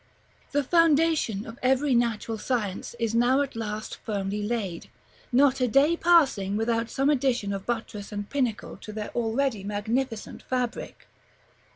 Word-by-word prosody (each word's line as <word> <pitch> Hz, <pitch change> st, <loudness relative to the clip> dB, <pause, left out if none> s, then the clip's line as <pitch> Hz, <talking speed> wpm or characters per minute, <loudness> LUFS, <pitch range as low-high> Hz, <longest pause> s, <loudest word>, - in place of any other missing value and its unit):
The 290 Hz, 0 st, +1 dB
foundation 320 Hz, -, +3 dB
of 225 Hz, +1 st, -10 dB
every 265 Hz, +2 st, +2 dB
natural 230 Hz, -2 st, 0 dB
science 220 Hz, -4 st, -2 dB
is 230 Hz, -2 st, -1 dB
now 245 Hz, +4 st, +3 dB
at 275 Hz, -3 st, -3 dB
last 215 Hz, -1 st, -4 dB
firmly 205 Hz, -1 st, -3 dB
laid, 205 Hz, -6 st, -3 dB, 0.4 s
not 265 Hz, +1 st, +4 dB
a 250 Hz, -, +3 dB
day 280 Hz, +7 st, +4 dB
passing 275 Hz, -, +3 dB
without 230 Hz, +1 st, 0 dB
some 275 Hz, +2 st, +2 dB
addition 250 Hz, -7 st, +1 dB
of 195 Hz, -1 st, -6 dB
buttress 225 Hz, -4 st, -4 dB
and 205 Hz, -1 st, -4 dB
pinnacle 250 Hz, -6 st, -2 dB
to 215 Hz, -, -9 dB
their 215 Hz, 0 st, -5 dB
already 235 Hz, -1 st, -1 dB
magnificent 220 Hz, +4 st, -3 dB
fabric. 250 Hz, -2 st, -4 dB
235 Hz, 145 wpm, -26 LUFS, 210-270 Hz, 0.4 s, not